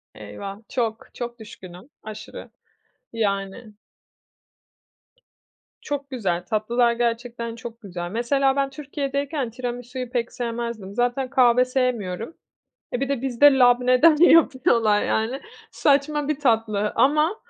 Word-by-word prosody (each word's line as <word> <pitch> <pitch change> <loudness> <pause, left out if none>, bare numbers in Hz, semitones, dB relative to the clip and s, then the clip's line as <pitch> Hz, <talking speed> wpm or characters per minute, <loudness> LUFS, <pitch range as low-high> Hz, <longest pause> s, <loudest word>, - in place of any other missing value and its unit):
Eyvah, 110 - -8
çok, 225 -3 -2
çok 240 0 -6
düşkünüm, 190 0 -12
aşırı, 215 0 -9 0.6
yani. 200 0 -3 2.1
Çok 285 -1 -5
güzel, 190 -10 -2
tatlılar 235 +2 +1
gerçekten 235 0 -3
çok 235 -1 -9
güzel. 175 -4 -6
Mesela 270 +4 +1
ben 275 -1 0
Türkiye'deyken 280 -1 -3
tiramisuyu 245 +1 -6
pek 240 -1 -2
sevmezdim, 235 -4 -5
zaten 245 +2 0
kahve 250 -2 +4
sevmiyorum. 245 - -2 0.6
E, 245 - -1
bir 275 - -1
de 275 -4 -1
bizde 270 +2 +4
labneden 250 +5 +5
yapıyorlar 260 -10 +4
yani, 230 +5 -1 0.3
saçma 290 +1 +1
bir 305 -2 -1
tatlı 220 -5 +1
ama 305 +7 +3
240 Hz, 110 wpm, -23 LUFS, 220-270 Hz, 2.1 s, labneden